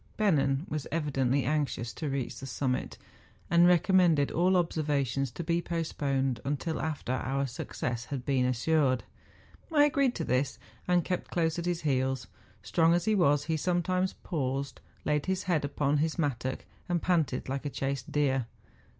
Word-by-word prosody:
Bennen 145 -8 +2
was 150 -2 -4
evidently 140 -4 +1
anxious 140 -5 -1
to 155 - -4
reach 135 -3 -3
the 135 - -7
summit, 130 -1 -2 0.5
and 170 0 +6
recommended 175 -4 +4
all 180 +3 +3
observa¬ 155 -5 +1
tions 135 +2 -1
to 145 +9 -6
be 170 +1 +1
postponed 140 -6 -1
until 145 +3 -2
after 155 -5 -3
our 135 +2 -1
success 120 -1 -4
had 130 -2 -5
been 135 -2 +2
assured. 130 +1 +2 0.7
I 295 -2 +5
agreed 275 -3 +2
to 165 - -2
this, 130 0 0 0.3
and 180 -2 +3
kept 180 -2 -2
close 165 -1 0
at 170 - -3
his 175 -2 -1
heels. 130 -2 0 0.4
Strong 165 0 +3
as 175 - 0
he 220 - +3
was, 145 -7 +3
he 160 +1 -1
sometimes 180 +3 0
paused, 135 -3 -2 0.2
laid 150 +1 0
his 190 0 0
head 170 -5 +1
upon 145 0 0
his 160 +1 0
mattock, 130 -5 -2 0.2
and 175 -1 +2
panted 160 -7 0
like 135 +2 -3
a - - -2
chased 135 -1 -3
deer. 135 -4 +1
145 Hz, 165 wpm, -29 LUFS, 135-170 Hz, 0.7 s, and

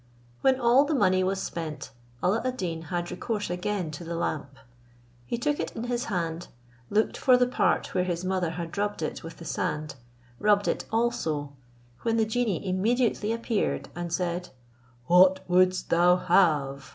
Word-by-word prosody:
When 265 -1 +3
all 245 +3 +5
the 300 +1 -1
money 185 -7 +3
was 190 +1 0
spent, 155 -6 -5 0.3
A]la 195 +5 +2
ad 255 0 -2
Deen 165 -5 -3
had 175 -1 -2
recourse 210 -6 -3
again 180 -1 -2
to 150 +3 -7
the 170 0 -5
lamp. 140 -4 -3 0.7
He - - -2
took 295 +4 -1
it - - -4
in 225 - -4
his 245 0 -2
hand, 170 -4 -3 0.4
looked 215 +2 +1
for 255 -1 +5
the 250 - +4
part 250 - 0
where 180 - +2
his 180 0 -3
mother 185 -2 0
had 165 0 -6
rubbed 205 -5 -1
it - - -4
with 165 - -9
the 165 - -10
sand, 150 -1 -2 0.5
rubbed 205 -1 +3
it - - -1
also, 160 -11 -1 0.5
when 230 -1 0
the 220 - +3
genie 215 -5 -1
immediately 220 +3 +1
appeared, 230 -1 -1
and 175 -1 -4
said, 175 0 -2 0.6
"What 185 +4 +5
wouldst 185 +1 +2
thou 175 +1 +5
have?" 150 -7 +2
185 Hz, 170 wpm, -27 LUFS, 170-225 Hz, 0.7 s, all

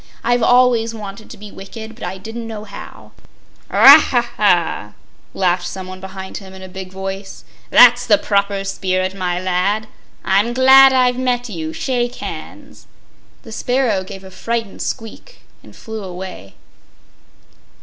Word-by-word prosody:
I've 240 +1 +1
always 240 -1 +3
wanted 210 0 -9
to - - -10
be 205 0 -11
wicked, 220 +3 -10
but 230 - -13
I 190 - -4
didn't 225 +4 -7
know 215 -2 -7
how." - - -11 0.6
"Haw, - - +9
haw, 240 -1 0
haw!" 170 - +1 0.4
laughed 180 -1 0
someone 185 0 -7
behind 190 0 -8
him, 190 -1 -11
in 190 - -11
a - - -8
big 185 0 -9
voice; 195 +1 -7 0.3
"that's 245 0 +6
the 210 -3 +5
proper 200 -1 0
spirit, 185 -1 -2
my 180 -2 -2
lad! 185 +4 -1 0.4
I'm 205 +5 +2
glad 265 +1 +7
I've 250 -1 +2
met 245 -1 -1
you; 160 -5 -5
shake 245 - -2
hands." - - -9 0.6
The 225 - -12
sparrow 240 -4 0
gave 195 0 -10
a 190 - -12
frightened 225 +2 -4
squeak 225 - -7 0.2
and - - -16
flew 220 -2 -8
away. 180 - -9
200 Hz, 150 wpm, -18 LUFS, 190-235 Hz, 0.6 s, Haw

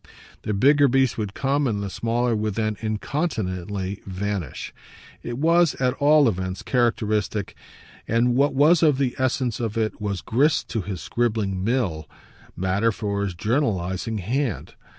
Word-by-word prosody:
The 105 - -2
bigger 140 +7 +5
beast 130 -2 +2
would 105 -2 -4
come 140 +1 +1
and 105 -4 -1
the 100 - -3
smaller 120 +2 0
would 105 -2 -2
then 110 -1 -1
incontinently 105 - -3
vanish. 95 -4 -4 0.5
It 120 0 -5
was 165 +2 +3
at 125 -1 +1
all 145 0 +5
events 95 -3 -2
characteristic, 110 -5 0 0.5
and 120 +2 +2
what 140 +3 +2
was 155 +5 +5
of 150 -5 +4
the 130 -3 0
essence 130 -3 0
of 115 -2 -3
it 110 -1 -1
was 100 -4 -2
grist 140 - +1
to 110 - -1
his 95 -3 -5
scribbling 105 - -1
mill, 100 - -1 0.5
matter 95 +5 +1
for 100 -1 -2
his 95 -3 -3
journalising 110 - -1
hand. 120 - -2
110 Hz, 150 wpm, -24 LUFS, 100-130 Hz, 0.5 s, bigger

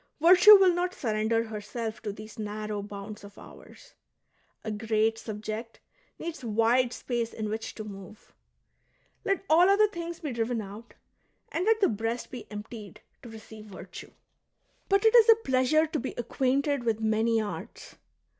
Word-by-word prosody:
Virtue 360 +6 +9
will 380 -3 +5
not 360 +1 -2
surrender 220 -1 0
herself 220 +1 -6
to 210 -2 -4
these 215 +2 -11
narrow 210 0 -4
bounds 205 +1 -9
of 200 0 -13
ours; - - -15 0.7
a 220 - -4
great 220 +1 0
subject 215 +1 -6 0.4
needs 330 -4 -7
wide 235 +2 +2
space 240 -2 -3
in 215 -1 -4
which 220 +1 -5
to 215 - -6
move. 205 0 -12 0.9
Let 390 0 -1
all 345 +4 +5
other 415 +2 +5
things 340 -3 -7
be 300 -4 -4
driven 235 0 -2
out, 215 +3 -10 0.6
and 345 +3 -1
let 445 0 +3
the 390 - +5
breast 225 +3 -3
be 245 -4 -9
emptied 210 -1 -9 0.2
to 240 - -11
receive 220 -1 -12
virtue. 200 -3 -10 0.4
" - - -42
But 395 +2 +3
it 445 - +5
is 460 -1 +7
a 455 - +10
pleasure 295 - +2
to 315 0 -3
be 260 - -5
acquainted 265 +3 0
with 225 -2 0
many 225 +1 +1
arts." 215 -2 -7
230 Hz, 160 wpm, -28 LUFS, 215-310 Hz, 0.9 s, a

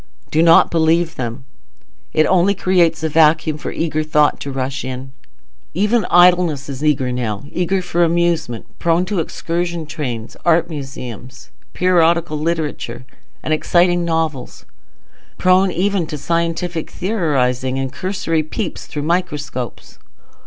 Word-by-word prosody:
Do 155 - +3
not 165 0 +6
believe 165 0 +2
them: 125 +1 -5 0.7
it 155 - +3
only 190 +2 +3
creates 175 -4 +2
a 160 - 0
vacuum 155 0 +3
for - - -5
eager 155 -1 -1
thought 150 -1 +2
to 140 - -5
rush 135 0 -3
in. 130 +1 -6 0.6
Even 210 +5 +2
idleness 175 -5 +4
is 140 +1 -5
eager 135 -4 +1
now—eager 140 - -2
for 175 -1 +1
amusement; 170 -8 0
prone 170 +1 +2
to 190 0 -2
excursion 170 +1 -3
trains, 125 -7 -5
art 170 0 +2
museums, 130 -3 -8 0.2
periodical 170 -3 +2
literature, 155 -5 -3 0.4
and 155 - 0
exciting 175 +2 +2
novels; 160 -5 -2 0.7
prone 185 +1 +4
even 185 -1 0
to 150 - -5
scientific 170 +2 -2
theorizing 135 - -1
and 135 -1 -3
cursory 185 -4 -1
peeps 165 +5 -5
through 145 -2 -5
microscopes. 150 - -3
160 Hz, 125 wpm, -18 LUFS, 140-175 Hz, 0.7 s, not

